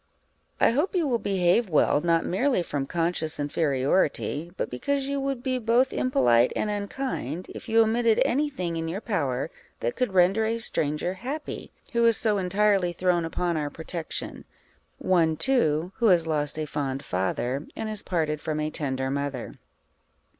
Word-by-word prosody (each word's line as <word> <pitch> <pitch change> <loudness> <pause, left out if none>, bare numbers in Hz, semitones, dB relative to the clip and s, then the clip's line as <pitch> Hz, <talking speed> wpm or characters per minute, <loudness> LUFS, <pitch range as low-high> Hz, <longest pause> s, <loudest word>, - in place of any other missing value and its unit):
_ - - -44 0.6
I - - +5
hope 300 - 0
you 340 -4 +2
will 240 -3 +1
behave 195 +2 +2
well, 150 -2 +3
not 165 0 +2
merely 225 +1 +1
from 140 -4 -3
conscious 165 -2 -1
inferiority, 145 +2 0
but - - -1
because 275 - -1
you 280 0 -1
would 270 -2 -2
be 255 -1 0
both 240 +3 +2
impolite 120 - +3
and 210 - -1
unkind, 200 - -4
if - - -9
you 225 0 +5
omitted 225 0 +2
any 290 +5 +1
thing 175 -11 -3
in 165 0 -3
your 175 +5 -3
power 155 - -2 0.3
that 120 - -2
could 250 -6 -1
render 190 +5 +4
a 230 +1 0
stranger 155 -5 -1
happy, 265 +10 -6 0.2
who 235 0 +2
is 230 -3 +4
so 210 -3 +1
entirely 190 -1 +2
thrown 175 -1 +1
upon 170 0 -1
our 150 -1 -2
protection 160 +1 -5 0.5
one, 165 -4 +2
too, 180 - +2
who 235 - +3
has 175 -4 +5
lost 150 -2 -1
a 155 - -2
fond 140 -2 -3
father, 120 +9 -2
and 220 - -4
is 215 -2 -3
parted 155 -4 -1
from 155 -1 -2
a 155 0 -1
tender 130 -3 -2
mother. 140 -3 -3
175 Hz, 170 wpm, -26 LUFS, 150-225 Hz, 0.6 s, I